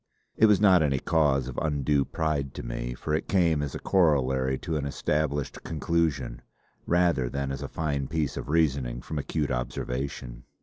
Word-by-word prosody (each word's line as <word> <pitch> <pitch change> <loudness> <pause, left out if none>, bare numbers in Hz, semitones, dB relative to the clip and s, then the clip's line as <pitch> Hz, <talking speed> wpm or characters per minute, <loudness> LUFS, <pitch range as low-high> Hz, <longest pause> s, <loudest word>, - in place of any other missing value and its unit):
It 110 - +5
was 105 -3 +5
not 95 -4 +6
any 70 -3 +2
cause 70 -3 +2
of 65 - -4
undue 70 -2 +1
pride 75 -4 -2
to - - -6
me, - - -4
for 75 - -4
it 80 - -1
came 85 -5 +2
as 70 -2 -4
a - - -4
corollary 65 -7 +2
to 80 +1 -4
an 70 -2 -1
established 75 0 -1
conclusion, 80 -4 -1 0.5
rather 85 -8 +2
than 70 0 -3
as 70 0 -4
a 70 - -4
fine 70 -4 -2
piece 75 -3 -1
of - - -6
reasoning 70 -6 +1
from 75 -1 -4
acute 75 +1 -2
observation. 60 0 -4
70 Hz, 175 wpm, -27 LUFS, 65-80 Hz, 0.5 s, not